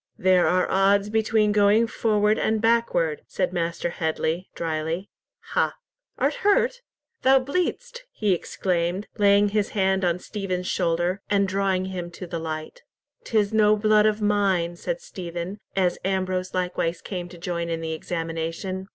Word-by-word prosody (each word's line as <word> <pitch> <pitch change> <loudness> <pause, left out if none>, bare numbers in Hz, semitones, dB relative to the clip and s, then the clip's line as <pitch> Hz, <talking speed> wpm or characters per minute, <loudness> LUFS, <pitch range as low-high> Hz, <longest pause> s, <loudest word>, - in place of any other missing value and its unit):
"There 185 -2 +4
are 180 +2 +3
odds 200 +2 +3
between 220 -1 +2
going 205 +2 +4
forward 215 -2 +1
and 220 0 +1
backward," 220 -9 +1
said 185 -1 -2
Master 170 -1 -2
Headley, 160 +2 -2
dryly. 165 +3 -3 0.4
"Ha! - - +1 0.4
Art - - +1
hurt? 475 +4 +2 0.4
Thou 265 +1 +6
bleedst," 365 - -2
he 210 -3 +1
exclaimed, 180 +2 -1
laying 205 0 +5
his 205 0 0
hand 190 0 +2
on 175 -1 +2
Stephen's 185 -2 -4
shoulder, 175 +1 0
and 200 -1 +2
drawing 190 -1 0
him 180 -2 -5
to 180 - -7
the 170 -1 -4
light. 160 - -6 0.4
"'Tis 215 -2 +1
no 215 -1 +5
blood 215 0 +4
of 215 0 0
mine," 195 -5 +1
said - - -4
Stephen, 180 - -6 0.2
as 185 -2 +1
Ambrose 185 -1 -1
likewise 180 -2 -1
came 180 -3 -6
to 175 - -12
join 170 0 -3
in 165 -1 -2
the 160 0 -3
examination. 165 +3 -4
190 Hz, 150 wpm, -24 LUFS, 175-210 Hz, 0.4 s, Thou